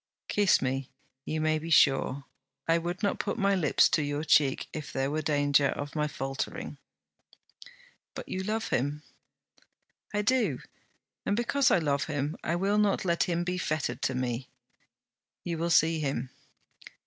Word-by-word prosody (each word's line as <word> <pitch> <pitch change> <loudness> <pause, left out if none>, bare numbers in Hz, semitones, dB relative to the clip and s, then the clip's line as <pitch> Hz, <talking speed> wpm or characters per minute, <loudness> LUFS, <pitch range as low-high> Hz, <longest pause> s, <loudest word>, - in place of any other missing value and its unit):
'Kiss 205 -8 +3
me; 135 0 -2 0.4
you 155 - -2
may 155 0 +1
be 165 +2 -7
sure. 140 -3 +3 0.4
I 165 0 +3
would 175 +3 -4
not 200 - 0
put - - -2
my 200 -2 +2
lips 175 -7 +4
to 155 - +2
your 145 +1 -2
cheek 150 -4 +3
if 155 -2 -6
there 135 +1 -1
were 155 +1 -1
danger 145 -1 +3
of 145 +2 -4
my 150 -1 +1
faltering.' 135 -2 -5 1.4
'But - - -7
you 185 - -3
love 220 +3 -2
him.' 145 +4 -1 1.1
'I 210 - 0
do: 220 - +1 0.6
and 205 - 0
because 240 +3 +2
I - - +4
love 145 -4 0
him 145 -1 -2
I 170 - 0
will 200 +4 +1
not 205 -2 +1
let 170 -1 +2
him 175 -1 -1
be 180 +1 -2
fettered 145 -7 -2
to 130 -1 0
me.' 125 0 -3 0.9
'You 170 -2 -3
will 170 +1 0
see 165 0 +4
him.' 135 -4 -2
155 Hz, 160 wpm, -29 LUFS, 140-180 Hz, 1.4 s, lips